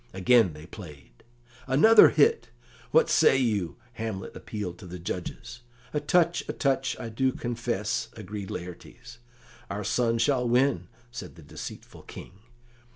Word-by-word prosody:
Again 95 -1 +4
they 75 +1 -11
played. 75 - -13 0.4
"Another 155 +13 +7
hit! 455 +1 +2 0.4
What 480 - +4
say 135 - +4
you?" 105 - -1 0.2
Hamlet 110 -5 -5
appealed 100 -5 -6
to 95 - -11
the 90 +1 -7
judges. 115 +7 -6 0.3
"A 150 - +1
touch, 170 +3 +2
a - - -1
touch, 135 -2 0
I 115 - -5
do 130 +4 0
confess," 120 -4 -3
agreed 105 -2 -7
Laertes. 90 +5 -9 0.5
"Our 100 +1 -4
son 115 +3 +1
shall 125 0 +1
win," 130 +3 +2 0.2
said 95 -7 -8
the 80 - -14
deceitful 75 - -10
King. - - -11
115 Hz, 140 wpm, -27 LUFS, 95-130 Hz, 0.5 s, Another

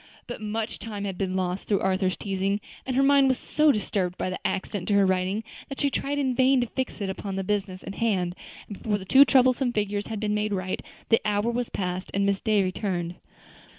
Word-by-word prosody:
But 240 -2 -7
much 215 +1 -3
time 210 -3 -5
had 195 -2 -3
been 185 0 -2
lost 185 0 -2
through 200 - +2
Arthur's 185 -1 +1
teasing, 195 0 -1 0.3
and 260 - -1
her 270 - +4
mind 280 0 +5
was 260 -1 +2
so 305 0 +3
disturbed 195 -5 -1
by 185 - -2
the 185 - -4
accident 190 -1 -3
to 205 - +2
her 200 -1 +5
writing 190 +3 0 0.3
that 275 - -6
she 280 - +1
tried 285 +2 -1
in 265 -3 +1
vain 260 +1 +4
to - - +1
fix 255 -1 -4
it 195 - -1
upon 195 0 -5
the 195 - -2
business 195 -2 -2
in 195 - -6
hand; 190 -6 0 0.3
and 205 - -8
before 210 -2 0
the 190 - -9
two 270 +8 +8
troublesome 255 -1 +4
figures 205 -1 -1
had 220 -2 -4
been 210 0 0
made 210 0 0
right, 185 -1 -2 0.3
the 225 - +4
hour 210 +2 +1
was 240 0 -2
past 180 0 -3
and 200 0 +2
Miss 200 -1 +1
Day 210 -3 +3
returned. 185 -2 -2
205 Hz, 225 wpm, -26 LUFS, 190-235 Hz, 0.3 s, two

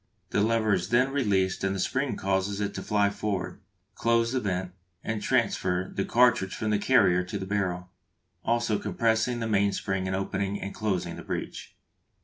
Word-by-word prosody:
The - - +2
lever 110 -1 +2
is 90 0 -1
then 125 +3 +3
released 100 -10 +1
and 95 0 0
the - - -3
spring 135 +7 0
causes 95 +1 -1
it 100 -1 -2
to - - -5
fly 105 -1 +2
forward, 100 -2 -3 0.3
close 115 0 +2
the 130 - +1
vent, 95 -4 -2 0.3
and 110 -1 -2
transfer 95 -7 0
the 100 - -1
cartridge 120 -6 +3
from 110 -1 -2
the 105 - +2
carrier 100 -7 +4
to 100 +3 -5
the 95 - -5
barrel, 90 -2 -2 0.5
also 115 -2 +1
compressing 110 +4 0
the 115 - -1
mainspring 100 -2 0
and 95 - -1
opening 100 +1 -2
and 100 - -5
closing 100 -4 -2
the - - -7
breech. - - -5
100 Hz, 175 wpm, -27 LUFS, 95-115 Hz, 0.5 s, carrier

